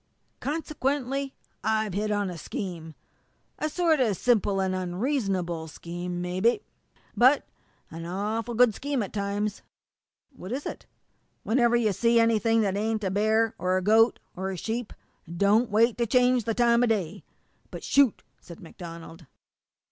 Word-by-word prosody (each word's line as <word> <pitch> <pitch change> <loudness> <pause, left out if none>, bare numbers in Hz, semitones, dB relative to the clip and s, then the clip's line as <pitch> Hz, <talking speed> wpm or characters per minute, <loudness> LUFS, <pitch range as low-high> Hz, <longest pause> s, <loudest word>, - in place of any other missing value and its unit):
Consequently, 275 -3 -2 0.3
I've 220 -2 0
hit 210 +2 -1
on 205 -2 0
a 175 - -7
scheme 165 -3 -6 0.6
a 310 - -1
sort 325 -2 +2
of 220 -7 +1
simple 210 -5 +2
and 190 -1 0
unreasonable 185 - -2
scheme, 175 +3 -6
mebby, 185 - +1 0.5
but 260 +4 +5 0.5
an 165 +1 -7
awful 215 +5 -3
good 245 -1 +5
scheme 275 0 -2
at 195 - -8
times." 205 0 -2 0.7
"What 185 -2 -9
is 270 +4 -3
it?" - - -7 0.6
"Whenever 240 +1 +3
you 220 -4 +2
see 235 +4 +3
anything 225 0 +3
that 195 -2 0
ain't 215 +1 -1
a 190 - -1
bear, 220 +3 +2
or 185 +1 +1
a 185 - -2
goat, 225 +4 +4 0.2
or 190 +1 -3
a 190 - -4
sheep, 225 +5 -4 0.4
don't 205 +7 +3
wait 225 +3 +3
to 235 - +1
change 250 0 +3
the 225 - -1
time 235 -1 +4
o' 245 - +3
day 200 -4 -1 0.5
but - - -8
shoot!" 275 -5 +3 0.2
said 170 - -12
MacDonald. 165 -1 -10
215 Hz, 150 wpm, -27 LUFS, 185-240 Hz, 0.7 s, but